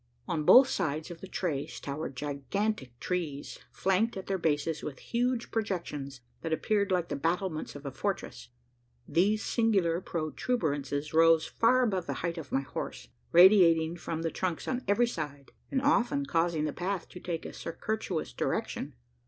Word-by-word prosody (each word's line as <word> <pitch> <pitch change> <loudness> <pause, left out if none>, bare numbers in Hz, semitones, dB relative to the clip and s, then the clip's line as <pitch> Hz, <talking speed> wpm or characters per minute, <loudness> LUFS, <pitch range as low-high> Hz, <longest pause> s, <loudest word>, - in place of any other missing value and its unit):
On 155 - -1
both 255 - +9
sides 160 - -2
of 170 - -10
the 190 - -7
trace 155 -7 -3
towered 140 0 -5
gigantic 140 - -3
trees, 160 -6 -3
flanked 195 +3 +1
at 190 - -6
their 195 -1 -1
bases 155 -1 0
with 140 -3 -6
huge 245 0 -1
projections, 150 - -3 0.2
that 165 - -4
appeared 200 +5 +1
like 180 -2 +1
the - - -1
battlements 165 +2 -2
of 145 0 -9
a 140 - -3
fortress, 195 +9 -4 0.6
these 205 +5 +2
singular 195 -7 +2
protuberances 155 - -2
rose 165 0 +5
far 255 +3 +3
above 190 -7 0
the - - -1
height 170 0 -2
of 160 - -9
my 135 - +2
horse 135 - -6 0.2
radiating 170 -3 +7
from 165 -1 -4
the 165 - -1
trunks 180 -3 -2
on 255 0 -1
every 205 +5 +4
side, 145 - -5 0.2
and 265 -1 0
often 280 0 +2
causing 165 - +1
the 150 - -2
path 185 +1 -3
to 180 - -10
take 170 -2 -4
a - - -7
circuitous 185 -1 -3
direction. - - -2
170 Hz, 160 wpm, -30 LUFS, 155-205 Hz, 0.6 s, both